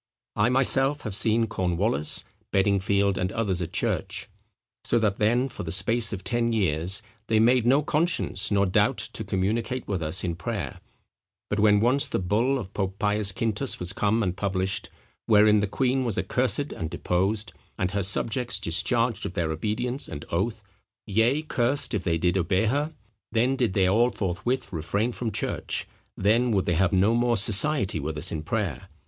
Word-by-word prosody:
I 105 Hz, +3 st, +2 dB
myself 135 Hz, +2 st, +3 dB
have 110 Hz, -, -5 dB
seen 115 Hz, +3 st, +4 dB
Cornewallis, 95 Hz, -4 st, 0 dB, 0.3 s
Beddingfield, 100 Hz, 0 st, +2 dB
and 90 Hz, +1 st, -1 dB
others 100 Hz, -6 st, -1 dB
at 85 Hz, -1 st, -4 dB
church. -, -, -2 dB, 0.6 s
So -, -, +1 dB
that 105 Hz, -3 st, +1 dB
then, 120 Hz, +5 st, +2 dB
for -, -, -8 dB
the 80 Hz, -, -5 dB
space 115 Hz, +6 st, +1 dB
of 95 Hz, -3 st, -5 dB
ten 120 Hz, -1 st, 0 dB
years, 95 Hz, 0 st, 0 dB, 0.2 s
they 110 Hz, -1 st, +2 dB
made 120 Hz, +1 st, +3 dB
no 140 Hz, +4 st, +4 dB
conscience 150 Hz, -, +1 dB
nor 100 Hz, -1 st, +2 dB
doubt 90 Hz, -, +2 dB
to -, -, -4 dB
communicate 115 Hz, +6 st, -2 dB
with 95 Hz, -4 st, -2 dB
us 80 Hz, +3 st, -2 dB
in 85 Hz, -3 st, -2 dB
prayer; 85 Hz, -, -5 dB, 0.7 s
but 105 Hz, -, 0 dB
when 105 Hz, -1 st, +4 dB
once 130 Hz, +5 st, +3 dB
the -, -, -1 dB
bull 110 Hz, +9 st, +1 dB
of 100 Hz, -7 st, -7 dB
Pope 95 Hz, -1 st, -3 dB
Pius 105 Hz, 0 st, 0 dB
Quintus 115 Hz, +5 st, -2 dB
was 90 Hz, +2 st, -3 dB
come 110 Hz, +3 st, +1 dB
and 90 Hz, -2 st, -1 dB
published, 95 Hz, -1 st, -2 dB, 0.4 s
wherein 105 Hz, -1 st, +5 dB
the 105 Hz, -, 0 dB
queen 130 Hz, +5 st, 0 dB
was 115 Hz, -4 st, -1 dB
accursed 130 Hz, +3 st, 0 dB
and 80 Hz, -, -5 dB
deposed, 100 Hz, +6 st, -1 dB, 0.2 s
and 95 Hz, 0 st, -1 dB
her 100 Hz, 0 st, -1 dB
subjects 115 Hz, +5 st, -1 dB
discharged 115 Hz, +8 st, +2 dB
of -, -, -8 dB
their 85 Hz, -3 st, -1 dB
obedience 115 Hz, -, -2 dB
and 75 Hz, -, -7 dB
oath, 105 Hz, +5 st, -1 dB, 0.4 s
yea, 115 Hz, +8 st, +1 dB
cursed 130 Hz, -2 st, 0 dB
if 105 Hz, -4 st, -1 dB
they 85 Hz, -1 st, +1 dB
did 90 Hz, +3 st, +1 dB
obey 95 Hz, +4 st, +1 dB
her: 145 Hz, +7 st, 0 dB, 0.4 s
then 120 Hz, +4 st, +2 dB
did 120 Hz, -7 st, 0 dB
they 95 Hz, -1 st, +3 dB
all 115 Hz, +6 st, +3 dB
forthwith 110 Hz, +4 st, -3 dB
refrain 100 Hz, +9 st, -1 dB
from 120 Hz, -1 st, -4 dB
church, -, -, -2 dB, 0.3 s
then 115 Hz, +5 st, +2 dB
would 95 Hz, -5 st, +1 dB
they 90 Hz, -, +1 dB
have 90 Hz, +2 st, +2 dB
no 100 Hz, +4 st, +3 dB
more 120 Hz, 0 st, +2 dB
society 105 Hz, -, +1 dB
with 75 Hz, +2 st, -4 dB
us 80 Hz, +4 st, -4 dB
in 80 Hz, -, -3 dB
prayer. 80 Hz, -, -3 dB
105 Hz, 175 wpm, -26 LUFS, 95-120 Hz, 0.7 s, wherein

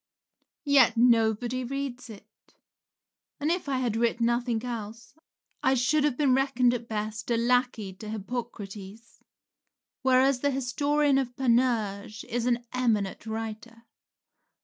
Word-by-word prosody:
Yet 265 Hz, -5 st, +5 dB
nobody 235 Hz, +1 st, +2 dB
reads 270 Hz, -1 st, -5 dB
it; 215 Hz, 0 st, -16 dB, 0.8 s
and 300 Hz, +2 st, 0 dB
if 350 Hz, -4 st, -2 dB
I 270 Hz, -, 0 dB
had 245 Hz, -4 st, -1 dB
writ 235 Hz, +1 st, +1 dB
nothing 235 Hz, 0 st, 0 dB
else, 230 Hz, -1 st, -7 dB, 0.5 s
I 265 Hz, +1 st, +3 dB
should 285 Hz, +5 st, +2 dB
have 290 Hz, -4 st, +1 dB
been 280 Hz, -4 st, +3 dB
reckoned, 260 Hz, -2 st, +2 dB
at 235 Hz, -1 st, -4 dB
best, 215 Hz, +3 st, -4 dB
a 235 Hz, -, +2 dB
lackey 240 Hz, -4 st, +1 dB
to 215 Hz, -, -8 dB
Hippocrates, 215 Hz, -1 st, -7 dB, 0.8 s
whereas 260 Hz, 0 st, +3 dB
the 285 Hz, -, +1 dB
historian 285 Hz, +2 st, +1 dB
of 250 Hz, -2 st, -4 dB
Panurge 230 Hz, -5 st, 0 dB
is 240 Hz, +1 st, -2 dB
an 240 Hz, -1 st, 0 dB
eminent 225 Hz, -5 st, -1 dB
writer. 225 Hz, +1 st, -6 dB
240 Hz, 125 wpm, -27 LUFS, 225-260 Hz, 0.8 s, Yet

